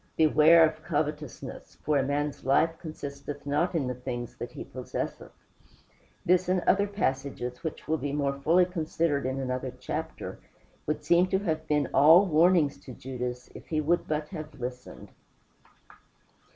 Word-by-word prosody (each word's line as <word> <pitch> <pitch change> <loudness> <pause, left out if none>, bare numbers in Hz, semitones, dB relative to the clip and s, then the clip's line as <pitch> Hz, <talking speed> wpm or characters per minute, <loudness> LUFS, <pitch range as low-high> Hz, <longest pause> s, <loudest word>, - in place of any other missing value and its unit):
"Beware 160 +1 +6
of 155 0 -7
covetousness, 150 -3 -4
for 150 - +1
a - - +1
man's 145 +2 -2
life 155 +5 +3
consisteth 145 -3 -7
not 150 +5 0
in 150 -5 +1
the 125 - -2
things 125 -1 -6
that - - -6
he - - -6
possesseth;" - - -5 1.0
this 180 +1 +3
and 185 0 +3
other 200 +3 +3
passages, 135 -8 -3
which 160 - -5
will 160 0 0
be 140 +1 -3
more 140 -1 0
fully 165 +6 +3
considered 160 -5 -1
in 130 +1 -2
another 130 0 -3
chapter, - - -5 0.5
would 150 0 -2
seem 170 +4 +4
to 190 - +1
have 160 -5 -2
been 150 -3 +1
all 165 +7 +7
warnings 165 -3 +3
to 130 - -10
Judas, 125 -1 -5
if - - -12
he 155 - -1
would 165 +3 +1
but 150 0 -2
have 155 -2 -8
listened. 125 +1 -7
150 Hz, 155 wpm, -28 LUFS, 135-165 Hz, 1.0 s, all